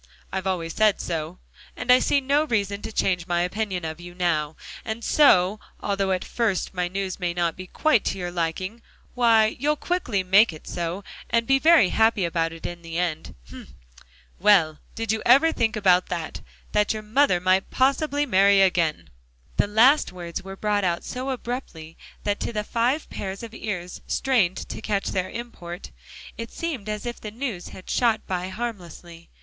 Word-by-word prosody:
I've 190 0 -2
always 170 -3 -2
said 215 -2 +3
so, 165 +1 -4 0.4
and 250 - +1
I 250 - +8
see 280 - +2
no 285 +3 +2
reason 205 -6 -1
to - - -6
change 180 -4 0
my 175 -1 +1
opinion 185 -1 -2
of 160 +1 -5
you 175 0 -10
now. 160 -4 0 0.3
And 225 +1 -5
so, 210 -10 +4 0.2
although 195 -1 -1
at 185 -1 -1
first 220 -6 -1
my 180 -1 -1
news 190 +1 -4
may 175 -2 -2
not 170 -2 0
be 185 0 -9
quite 260 - +2
to - - -1
your 175 -1 -4
liking, 180 +6 -3 0.3
why, 225 -3 +4
you'll 300 +3 +2
quickly 285 - -1
make 195 +4 +5
it 155 - -12
so, 175 +3 -3 0.3
and 230 0 +2
be 270 +2 +3
very 315 - +6
happy 220 -4 +3
about 165 -1 0
it 165 0 -10
in 175 0 -6
the 165 0 -6
end. 170 -3 -2 0.2
Hem! - - -12 0.6
well, 180 -7 +4 0.2
did 225 -2 -1
you 220 -1 -1
ever 275 +7 +6
think 225 -6 0
that 185 -2 +4 0.6
that 210 0 +2
your 215 0 -6
mother 220 -3 +3
might 185 +2 +2
possibly 285 +2 +1
marry 200 -4 +5
again?" 165 - +1 0.5
The - - +3
last 240 +8 +4
words 170 -2 -6
were 195 0 -8
brought 205 0 0
out 170 -2 0
so 255 +1 -5
abruptly, 240 -11 -5 0.3
that 205 0 -1
to - - -3
the 210 -2 -2
five 245 +8 0
pairs 195 +2 -5
of 230 -1 -8
ears 180 -6 -5
strained 225 -10 +1
to - - -6
catch 200 -2 -1
their 185 -1 -2
import, 200 -7 -8 0.5
it 230 0 -5
seemed 280 -11 -4
as 210 +1 -4
if 240 0 -5
the 215 - -5
news 225 -5 -5
had 185 - -12
shot 230 -3 +1
by 180 -1 -3
harmlessly. 175 -6 -7
200 Hz, 180 wpm, -24 LUFS, 175-230 Hz, 0.6 s, I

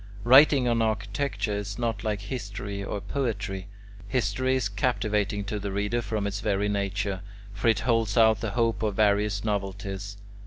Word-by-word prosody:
Writing 130 +1 +7
on 115 -1 +2
architecture 110 +2 -1
is 100 0 -4
not 115 -3 -2
like 105 -2 -1
history 100 -2 -5
or 100 - -3
poetry. 100 -4 -3 0.4
History 130 +2 0
is 130 -5 0
captivating 105 -2 0
to 105 +1 -3
the 100 0 -4
reader 105 +4 0
from 110 -3 -2
its 100 0 -2
very 105 -1 0
nature; 100 -1 -1 0.3
for 105 - -2
it 110 -3 +3
holds 115 -3 +1
out 110 -2 +5
the 115 - -1
hope 115 -1 +1
of 105 -3 0
various 105 -1 +2
novelties. 100 -1 -3
105 Hz, 160 wpm, -27 LUFS, 100-115 Hz, 0.4 s, Writing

